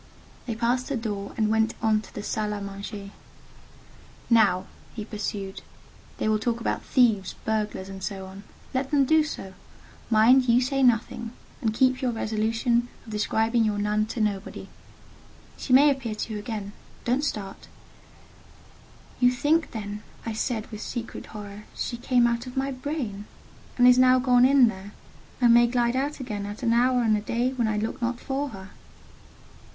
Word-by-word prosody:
They 230 - -2
passed 245 +3 0
the 280 - -1
door 205 -3 -4
and 215 -2 +2
went 220 0 +2
on 215 -1 +2
to 215 - -15
the 205 - -5
salle 210 0 -2
à - - -6
manger. 200 0 -7 1.2
"Now," 195 -5 +4 0.3
he 215 -2 -5
pursued, 205 -2 -5 0.6
"they - - -1
will 215 0 +2
talk 235 +1 -1
about - - -2
thieves, 225 -7 +2
burglars, 215 -3 -2
and 195 0 -8
so 195 -1 -4
on: 190 +1 -10 0.3
let 265 +1 -1
them 280 -2 +3
do 315 +3 +4
so—mind 230 +2 0
you 235 +1 +6
say 270 +2 0
nothing, 235 -1 +1 0.3
and 225 - +1
keep 255 +3 +2
your 255 - +1
resolution 225 +2 0 0.2
of 220 - -10
describing 225 +2 +1
your 210 -2 0
nun 210 +1 0
to 230 - -5
nobody. 205 -2 -2 0.9
She - - -6
may 285 +3 +7
appear 255 -6 -3
to 220 +1 -4
you 210 - -3
again: 205 -2 -5 0.3
don't 255 +4 +1
start." 205 -9 -4 1.5
"You 245 - +6
think 295 +6 +1
then," 210 -2 -6 0.2
I 225 - -3
said, 220 0 -2
with 215 -1 -7
secret 235 0 -6
horror, 210 -1 -9
"she 240 - -3
came 245 0 +2
out 235 +1 0
of 250 +1 -9
my 270 +1 0
brain, 255 -7 -4 0.5
and 245 0 +6
is 250 0 +7
now 255 0 +6
gone 250 -1 +4
in 265 -2 +6
there, 200 -1 -6 0.5
and 240 -2 +6
may 240 0 +6
glide 240 0 +1
out 285 +3 -1
again 210 -6 -4
at 205 +5 -7
an 230 -1 +3
hour 250 +1 +3
and 220 -2 +3
a 210 - -1
day 240 +4 -1
when 240 -3 0
I 215 -1 0
look 220 +4 -3
not 240 0 -1
for 275 +2 -3
her?" 190 -4 -10
230 Hz, 175 wpm, -26 LUFS, 210-250 Hz, 1.5 s, may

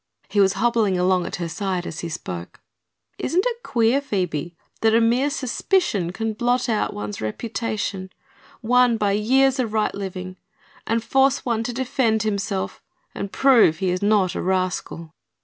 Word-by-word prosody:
He 205 +1 0
was 195 -1 +5
hobbling 220 -2 +1
along 180 0 +2
at - - -4
her 170 -1 -4
side 185 0 -3
as 165 - -6
he 170 - -4
spoke. 90 - -7 0.6
"Isn't 360 +3 +1
it 475 -1 -4
queer, 240 - +2
Phoebe, 175 - -3 0.3
that 225 0 +4
a - - +6
mere 240 +5 +2
suspicion 260 - 0
can 225 +3 -3
blot 245 +3 0
out 220 -3 0
one's 105 0 -5
reputation, 200 - -3 0.5
won 245 0 +4
by 205 -2 +1
years 260 +6 +3
of 230 -4 -1
right 215 -1 +1
living, 185 -2 -6 0.5
and 225 0 0
force 270 +3 +2
one 230 -3 0
to 245 - -2
defend 240 -3 0
himself 200 -2 -2 0.3
and 200 - -5
prove 240 - +5
he 185 +1 0
is 180 - -2
not 200 -3 +2
a - - -3
rascal?" 185 -3 -2
215 Hz, 165 wpm, -22 LUFS, 185-240 Hz, 0.6 s, a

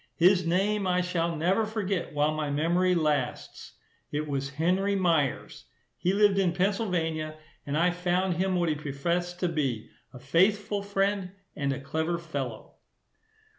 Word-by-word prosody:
His 180 0 +4
name 195 +3 +1
I 180 0 +2
shall 170 -2 -1
never 180 +8 +2
forget 205 -4 -2
while 150 +1 +1
my 155 -1 -2
memory 175 +5 +2
lasts; 150 -6 -2 0.4
it 150 +1 -2
was 140 -1 -2
Henry 180 +7 +1
Myers. 165 -8 0 0.3
He 180 - 0
lived 200 0 +4
in 180 -3 +2
Pennsylvania, 175 -5 -1 0.3
and 140 +1 -1
I 175 +2 +3
found 180 0 0
him 190 +1 +1
what 175 -2 +1
he - - +2
professed 170 +5 -2
to 180 - +2
be, 135 -9 -2 0.2
a - - -11
faithful 195 +10 +1
friend 195 -1 -1 0.2
and 140 -1 -1
a 135 - -3
clever 160 +5 -2
fellow. 140 -9 -6
175 Hz, 150 wpm, -28 LUFS, 150-190 Hz, 0.4 s, His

